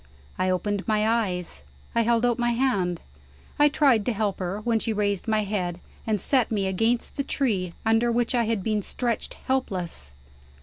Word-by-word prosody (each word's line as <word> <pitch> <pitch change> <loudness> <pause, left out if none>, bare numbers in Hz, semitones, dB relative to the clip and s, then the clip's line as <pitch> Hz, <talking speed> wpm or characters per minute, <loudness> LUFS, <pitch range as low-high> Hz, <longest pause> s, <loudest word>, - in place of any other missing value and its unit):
I 185 - +2
opened 200 +3 -1
my 215 -1 +2
eyes; 195 - -1 0.3
I 230 - +3
held 235 +1 +2
out 240 -1 +1
my 240 0 +2
hand; 200 -9 0 0.6
I 295 0 +6
tried 270 -7 +3
to 245 - +2
help 205 -2 -1
her 185 +2 -3
when 230 0 +1
she 225 0 -1
raised 205 -1 -1
my 215 -1 +2
head, 180 -4 -2 0.3
and 215 -2 +1
set 255 +4 +2
me 205 -3 0
against 225 +6 0
the 280 - 0
tree 205 -11 -1
under 225 +2 +3
which 240 +2 +1
I 240 -2 +2
had 220 -3 -1
been 215 0 0
stretched 235 +3 -2
helpless. 185 - -2
220 Hz, 180 wpm, -25 LUFS, 195-235 Hz, 0.6 s, I